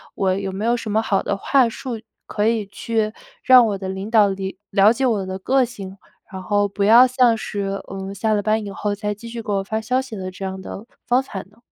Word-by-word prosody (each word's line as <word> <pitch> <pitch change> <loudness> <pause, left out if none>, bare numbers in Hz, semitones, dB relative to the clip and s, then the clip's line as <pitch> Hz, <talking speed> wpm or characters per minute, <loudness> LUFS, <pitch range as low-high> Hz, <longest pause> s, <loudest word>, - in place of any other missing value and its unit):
我 190 -1 +1
有 195 0 -3
没 195 +3 -4
有 235 +1 +3
什 220 -2 -5
么 220 +1 +2
好 200 -3 0
的 - - -1
话 265 +4 +3
术， 235 -1 -6 0.3
可 210 0 0
以 225 -2 +1
去 215 +1 -2 0.3
让 255 -2 +7
我 205 -2 -2
的 190 -1 -6
领 190 +2 -5
导 215 -3 +6
里 195 0 -4
了 200 +1 +6
解 265 +3 0
我 215 -6 +1
的 190 0 -5
个 265 +7 +2
性， 200 -6 -7 0.4
然 190 -1 -6
后， 205 +2 +1
不 200 0 -3
要 230 +5 +8
像 250 -3 +3
是， 195 -2 -4
嗯， 195 0 -6
下 215 +2 0
了 205 - +1
班 215 +2 0
以 200 - -6
后， 205 +1 -2
再 210 0 -3
继 230 +3 -10
续 230 0 -6
给 210 - -4
我 195 -1 0
发 220 +3 -2
消 250 +4 0
息 265 -4 -8
的 185 -1 -5
这 185 - -9
样 190 0 -4
的 200 +3 -8 0.2
方 250 +2 +3
法 205 -7 -7
呢？ 205 +3 -26
210 Hz, 265 characters per minute, -21 LUFS, 195-230 Hz, 0.4 s, 要